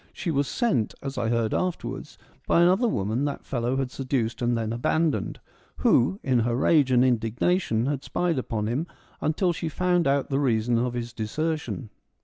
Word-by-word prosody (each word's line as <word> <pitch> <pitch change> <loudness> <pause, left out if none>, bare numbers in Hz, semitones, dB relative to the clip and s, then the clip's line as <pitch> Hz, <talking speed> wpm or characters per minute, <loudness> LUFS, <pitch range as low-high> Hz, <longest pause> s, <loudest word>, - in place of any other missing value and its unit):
She 175 - -3
was 140 -2 +1
sent, 220 - 0
as 135 0 -4
I 115 - 0
heard 115 -2 0
afterwards, 185 -2 -3 0.3
by 170 - +4
another 190 +8 +4
woman 110 - -1
that 145 -1 -4
fellow 120 +1 -1
had 135 -2 -2
seduced 130 -4 -2
and 120 0 +1
then 110 0 -2
abandoned, 155 +6 0 0.4
who, 160 - +3
in 130 -3 +2
her 120 +1 +1
rage 140 +1 +3
and 125 0 +5
indignation 120 - +1
had 140 0 -2
spied 170 -7 -1
on 105 -2 -1
him 130 +10 -1 0.3
until 170 +4 +1
she 165 0 -3
found 180 0 +1
out 140 0 +1
the 135 - +2
reason 120 -3 +2
of 125 0 -1
his 120 0 -4
desertion. 150 +1 -3
130 Hz, 175 wpm, -26 LUFS, 120-160 Hz, 0.4 s, and